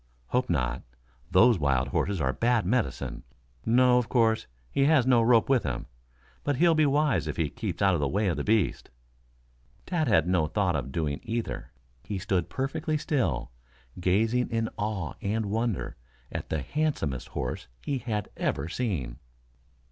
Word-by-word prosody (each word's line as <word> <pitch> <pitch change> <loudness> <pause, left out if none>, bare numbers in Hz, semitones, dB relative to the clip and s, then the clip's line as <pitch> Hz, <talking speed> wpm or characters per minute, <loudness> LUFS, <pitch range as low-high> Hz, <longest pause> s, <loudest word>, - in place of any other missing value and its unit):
"Hope 125 +1 0
not. 65 -6 0 0.5
Those 120 -4 +5
wild 65 -3 +1
horses 95 +7 0
are 65 -2 +1
bad 115 - +1
medicine. 120 +5 -1 0.5
No, 125 +1 +5
of 125 - -3
course, 115 -3 +2 0.2
he 135 - +2
has 145 -4 +4
no 125 -2 +5
rope 115 -1 +4
with 135 -3 +3
him. 65 -4 -3 0.6
But 145 - 0
he'll 170 +4 +4
be 155 -2 +4
wise 140 - +2
if 75 - -4
he 80 -3 0
keeps 100 -6 -3
out 95 -1 +5
of 85 - +1
the 70 - +1
way 100 +10 0
of 85 - +1
the - - -3
beast." 110 -3 +1 1.0
Tad 165 -5 0
had 80 -7 +3
no 90 -4 +2
thought 90 +1 0
of 65 -3 -3
doing 75 -2 -1
either. 115 - -4 0.3
He 100 - -4
stood 95 -2 -1
perfectly 135 +3 -2
still, 120 - -1 0.5
gazing 110 +7 +2
in 115 -1 -1
awe 105 -7 -3
and 105 0 -1
wonder 115 -3 -1 0.3
at - - -5
the 80 -3 -1
handsomest 80 - -1
horse - - -4 0.2
he 135 - -1
had 110 -5 -3
ever 70 - -1
seen. 85 - -3
105 Hz, 165 wpm, -28 LUFS, 80-125 Hz, 1.0 s, Those